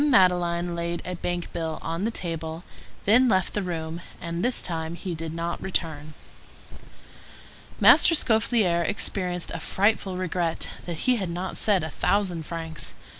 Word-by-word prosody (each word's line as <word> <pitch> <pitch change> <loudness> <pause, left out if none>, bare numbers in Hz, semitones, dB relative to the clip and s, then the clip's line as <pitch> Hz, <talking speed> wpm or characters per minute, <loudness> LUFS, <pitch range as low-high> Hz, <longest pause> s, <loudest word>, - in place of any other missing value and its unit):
Madeleine 175 -5 +3
laid 170 0 -3
a 180 - -3
bank 175 0 -4
bill 160 -2 -3
on 165 +4 -2
the - - +1
table, 165 -5 -4 0.4
then 245 +5 +5
left 190 -4 +2
the 205 - -1
room; 165 -2 -4 0.2
and 170 +1 -4
this 250 0 +3
time 165 -1 -3
he 180 0 -5
did 165 0 -5
not 170 +1 -3
return. 155 -5 -2 1.6
Master 330 - +7
Scaufflaire 220 - +3
experienced 180 -2 -1
a 165 - -4
frightful 195 +1 +1
regret 175 -2 -2 0.2
that 170 -3 -4
he 255 -1 +4
had 190 -5 -3
not 180 +2 -4
said 200 -6 +3
a 160 - -4
thousand 180 -5 0
francs. 165 -2 -6
175 Hz, 150 wpm, -26 LUFS, 165-190 Hz, 1.6 s, Master